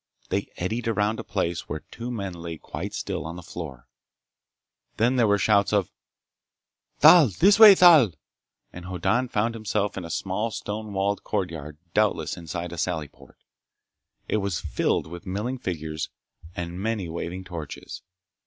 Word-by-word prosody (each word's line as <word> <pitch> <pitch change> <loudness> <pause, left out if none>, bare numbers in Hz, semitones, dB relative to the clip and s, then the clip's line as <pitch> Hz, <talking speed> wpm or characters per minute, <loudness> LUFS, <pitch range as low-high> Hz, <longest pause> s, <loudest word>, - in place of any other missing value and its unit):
They - - -1
eddied 110 +7 -2
around 105 0 0
a - - -4
place 85 -4 -2
where 75 +1 -4
two 120 +1 -6
men 100 -6 -4
lay 85 -1 -7
quite - - -6
still - - -3
on 80 +2 -6
the 90 - -9
floor. 75 -7 -8 1.1
Then 120 +4 +3
there 120 -3 +4
were 100 0 +4
shouts 100 +1 +3
of, 100 -4 +1 1.1
"Thal! 170 -6 +8
This 195 - +4
way, 215 -3 +11
Thal!" 160 - +7 0.6
and 90 0 -9
Hoddan 95 +8 0
found 115 0 0
himself 105 -2 -2
in 95 - -4
a 85 - -7
small 95 +6 -2
stone 105 0 -5
walled 100 +1 -1
courtyard 80 -7 -4 0.2
doubtless 105 -1 +1
inside 85 0 -5
a 85 - -6
sally 80 -5 -2
port. - - -19 0.9
It - - +1
was 100 -5 -1
filled - - 0
with 85 +3 -10
milling 110 +8 -3
figures 80 -6 -4 0.5
and 90 -1 -5
many 110 -4 -2
waving 85 +3 -5
torches. 85 -6 -8
95 Hz, 155 wpm, -25 LUFS, 85-110 Hz, 1.1 s, way